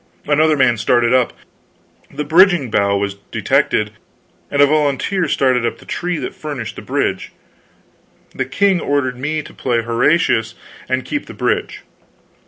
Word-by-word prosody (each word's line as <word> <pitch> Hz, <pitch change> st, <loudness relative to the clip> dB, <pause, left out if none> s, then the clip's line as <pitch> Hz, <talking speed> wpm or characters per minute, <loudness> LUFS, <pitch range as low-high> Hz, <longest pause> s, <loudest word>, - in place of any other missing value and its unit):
Another 155 Hz, +1 st, +3 dB
man 125 Hz, -4 st, +3 dB
started 120 Hz, +2 st, +2 dB
up; 130 Hz, -2 st, +3 dB, 0.8 s
the 150 Hz, +2 st, -4 dB
bridging 165 Hz, -, +4 dB
bough 100 Hz, -1 st, +2 dB
was 100 Hz, 0 st, -3 dB
detected, 105 Hz, 0 st, +1 dB, 0.6 s
and 145 Hz, -, -2 dB
a 145 Hz, -, +8 dB
volunteer 155 Hz, +5 st, 0 dB
started 130 Hz, -4 st, +1 dB
up 115 Hz, -, -2 dB
the -, -, -17 dB
tree 180 Hz, -1 st, -3 dB
that 135 Hz, -, -5 dB
furnished 145 Hz, -7 st, -6 dB
the -, -, -8 dB
bridge. -, -, -2 dB, 1.0 s
The 130 Hz, -, -2 dB
king 190 Hz, +7 st, +2 dB
ordered 130 Hz, -3 st, -1 dB
me 155 Hz, +3 st, -2 dB
to -, -, -13 dB
play 120 Hz, -3 st, -1 dB
Horatius 115 Hz, -1 st, +1 dB, 0.3 s
and 130 Hz, 0 st, -1 dB
keep 290 Hz, -, -4 dB
the -, -, -10 dB
bridge. -, -, -2 dB
135 Hz, 150 wpm, -18 LUFS, 120-155 Hz, 1.0 s, a